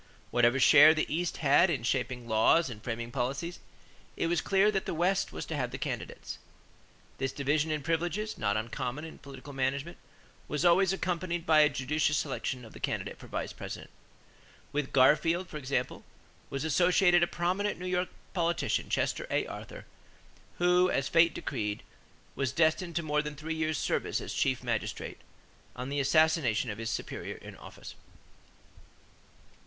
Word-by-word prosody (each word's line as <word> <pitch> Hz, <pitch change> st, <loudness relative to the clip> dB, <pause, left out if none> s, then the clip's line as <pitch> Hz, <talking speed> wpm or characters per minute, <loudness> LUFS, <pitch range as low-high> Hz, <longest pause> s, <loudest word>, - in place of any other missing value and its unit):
Whatever 120 Hz, +2 st, +3 dB
share 150 Hz, +3 st, +8 dB
the 155 Hz, -, +1 dB
East 175 Hz, +1 st, -1 dB
had 145 Hz, +7 st, +6 dB
in 135 Hz, -8 st, -1 dB
shaping 125 Hz, -1 st, -1 dB
laws 120 Hz, +7 st, +3 dB
and 105 Hz, -2 st, -10 dB
framing 120 Hz, 0 st, -4 dB
policies, 135 Hz, +7 st, -3 dB, 0.6 s
it -, -, 0 dB
was 170 Hz, -1 st, +1 dB
clear 195 Hz, +2 st, +3 dB
that 195 Hz, -2 st, -2 dB
the -, -, -2 dB
West 185 Hz, +4 st, +1 dB
was -, -, -6 dB
to 160 Hz, -, -4 dB
have 125 Hz, -4 st, -1 dB
the 125 Hz, -, -6 dB
candidates. -, -, -5 dB, 0.8 s
This 135 Hz, 0 st, -1 dB
division 150 Hz, +3 st, 0 dB
in 155 Hz, -2 st, -2 dB
privileges 175 Hz, +7 st, -1 dB
not 100 Hz, 0 st, 0 dB
uncommon 125 Hz, +6 st, -4 dB
in 160 Hz, -, -10 dB
political 140 Hz, +1 st, -11 dB
management 135 Hz, +5 st, -2 dB, 0.5 s
was 150 Hz, +4 st, -1 dB
always 180 Hz, +2 st, +5 dB
accompanied 175 Hz, -2 st, -2 dB
by 155 Hz, -1 st, +5 dB
a 150 Hz, -1 st, +6 dB
judicious 145 Hz, +2 st, 0 dB
selection 125 Hz, -2 st, -3 dB
of 110 Hz, -, -13 dB
the -, -, -11 dB
candidate -, -, -3 dB
for -, -, -12 dB
Vice -, -, -4 dB
President. -, -, -8 dB, 0.8 s
With 145 Hz, -1 st, -2 dB
Garfield, 165 Hz, +7 st, +4 dB
for 155 Hz, -, -7 dB
example, 140 Hz, -1 st, -2 dB, 0.5 s
was 140 Hz, +2 st, -3 dB
associated 175 Hz, +3 st, +4 dB
a 170 Hz, -, +4 dB
prominent 185 Hz, +5 st, -1 dB
New 180 Hz, -, -7 dB
York 180 Hz, 0 st, 0 dB, 0.2 s
politician, 170 Hz, -1 st, 0 dB
Chester -, -, -1 dB
A. -, -, +1 dB
Arthur, -, -, -9 dB, 0.7 s
who, 180 Hz, +1 st, +4 dB
as 135 Hz, -5 st, 0 dB
fate 165 Hz, -1 st, +4 dB
decreed, 105 Hz, -6 st, -3 dB, 0.5 s
was 135 Hz, -3 st, -1 dB
destined 165 Hz, +3 st, +1 dB
to 170 Hz, -, 0 dB
more 150 Hz, -1 st, +1 dB
than 150 Hz, 0 st, -6 dB
three 155 Hz, +2 st, -4 dB
years' 155 Hz, -1 st, -1 dB
service -, -, -1 dB
as -, -, -6 dB
chief -, -, 0 dB
magistrate, -, -, -3 dB, 0.6 s
on 125 Hz, +2 st, -5 dB
the 145 Hz, +1 st, -1 dB
assassination 140 Hz, -5 st, +2 dB
of 105 Hz, -, -7 dB
his 115 Hz, -1 st, -3 dB
superior -, -, -4 dB
in -, -, -11 dB
office. -, -, -11 dB
155 Hz, 165 wpm, -30 LUFS, 135-175 Hz, 0.8 s, share